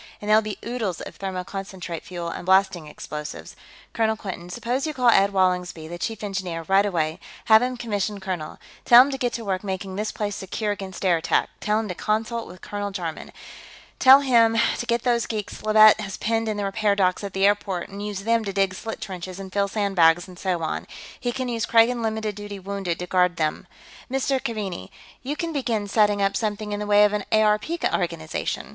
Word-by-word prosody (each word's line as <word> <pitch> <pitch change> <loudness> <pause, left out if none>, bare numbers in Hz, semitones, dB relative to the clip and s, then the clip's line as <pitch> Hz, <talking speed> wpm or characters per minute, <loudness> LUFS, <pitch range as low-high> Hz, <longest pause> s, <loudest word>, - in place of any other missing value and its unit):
"And 205 - -8
there'll 215 +1 +5
be 215 -2 -5
oodles 225 -7 -3
of - - -9
thermoconcentrate 190 -2 -5
fuel, 175 -6 -6
and - - -6
blasting 190 -3 +2
explosives. 150 0 -7 0.4
Colonel 220 -1 +1
Quinton, 180 -4 -7
suppose 245 - -2
you 305 - -4
call 250 -2 +4
Ed 200 -3 +5
Wallingsby, 180 -4 0
the 175 +1 -7
Chief 220 0 -4
Engineer, 190 -5 -3
right 195 +1 +4
away; 160 -4 -1 0.3
have 220 0 +7
him 250 0 -1
commissioned 210 -3 -2
colonel. 180 -5 -4 0.3
Tell 240 +1 +9
him 280 - -3
to 270 - -3
get 245 -1 0
to 230 - -5
work 190 -1 -2
making 190 -1 -4
this 215 +1 -2
place 205 -1 -3
secure 205 +2 -3
against 195 -1 -6
air 175 -2 +4
attack; 160 - 0
tell 210 +1 +1
him 220 - -3
to 185 - -3
consult 220 +4 -2
with 180 - -12
Colonel 205 0 -4
Jarman. 175 -5 -5 0.7
Tell 270 +1 +8
him 230 -4 +4 0.2
to - - -2
get 235 0 0
those 240 -2 +1
geeks 215 -3 -5
Leavitt 215 0 +7
has 195 -2 -5
penned 225 0 0
in 215 - -2
the 205 - -2
repair 200 +1 +1
dock 185 0 +1
at 200 - -5
the 195 +1 +2
airport 200 -3 +1
and 200 +1 -8
use 205 -2 -4
them 230 +2 +1
to 200 - -3
dig 195 -1 +1
slit 225 +4 -6
trenches 185 -1 -6
and 190 -1 -8
fill 200 0 +1
sandbags 185 -5 +3
and 180 -1 -13
so 180 -3 -1
on. 160 - -3 0.3
He 245 - -1
can 255 +1 -3
use 230 -2 -2
Kragan 235 +1 +4
limited 220 -1 -2
duty 205 0 -7
wounded 195 -3 -3
to 180 - -5
guard 180 0 +2
them.... 155 -2 -2 0.4
Mr. 270 0 0
Keaveney, 195 - -4 0.3
you'll 300 +5 -3
begin 235 -7 -1
setting 205 -1 +2
up 195 0 +1
something 210 -1 -2
in 205 - -2
the 210 - -4
way 205 0 +6
of 210 - +1
an 210 -1 -1
ARP 215 +2 +3 0.2
organization. 165 -4 -3
205 Hz, 205 wpm, -24 LUFS, 185-220 Hz, 0.7 s, Tell